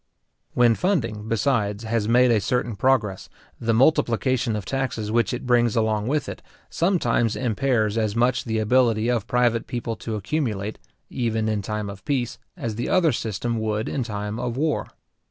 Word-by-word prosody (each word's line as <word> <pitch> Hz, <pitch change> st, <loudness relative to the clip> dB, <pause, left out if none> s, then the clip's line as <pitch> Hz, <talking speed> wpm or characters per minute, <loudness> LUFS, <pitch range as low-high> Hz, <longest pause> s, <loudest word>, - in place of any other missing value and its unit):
When 120 Hz, -1 st, +5 dB
funding, 115 Hz, -, -1 dB
besides, 110 Hz, -3 st, 0 dB
has 110 Hz, -1 st, -1 dB
made 125 Hz, +2 st, +5 dB
a 110 Hz, -3 st, +3 dB
certain 120 Hz, +2 st, -1 dB
progress, 105 Hz, -4 st, +1 dB, 0.3 s
the 115 Hz, -, 0 dB
multiplication 125 Hz, -2 st, +2 dB
of 105 Hz, -3 st, -4 dB
taxes 115 Hz, -4 st, -2 dB
which 115 Hz, +1 st, +2 dB
it 125 Hz, +1 st, -4 dB
brings 120 Hz, -2 st, +3 dB
along 110 Hz, -1 st, +1 dB
with 145 Hz, +2 st, 0 dB
it, -, -, -7 dB, 0.3 s
sometimes 125 Hz, -, +1 dB
impairs 115 Hz, -2 st, 0 dB
as 110 Hz, -1 st, -1 dB
much 120 Hz, +2 st, +2 dB
the 110 Hz, -2 st, -1 dB
ability 115 Hz, 0 st, +2 dB
of 115 Hz, -5 st, -1 dB
private 120 Hz, -2 st, +1 dB
people 120 Hz, -2 st, -3 dB
to 110 Hz, +4 st, -4 dB
accumulate, 110 Hz, -3 st, -2 dB, 0.3 s
even 110 Hz, -3 st, -1 dB
in 105 Hz, -1 st, 0 dB
time 105 Hz, +1 st, -3 dB
of 100 Hz, 0 st, -9 dB
peace, 130 Hz, -5 st, -2 dB, 0.2 s
as 115 Hz, -9 st, -4 dB
the 120 Hz, -, -2 dB
other 175 Hz, -4 st, +4 dB
system 115 Hz, +1 st, -2 dB
would 110 Hz, 0 st, -1 dB
in 140 Hz, -, -2 dB
time 105 Hz, -1 st, -4 dB
of 125 Hz, 0 st, -3 dB
war. 155 Hz, +1 st, 0 dB
115 Hz, 170 wpm, -24 LUFS, 110-125 Hz, 0.3 s, When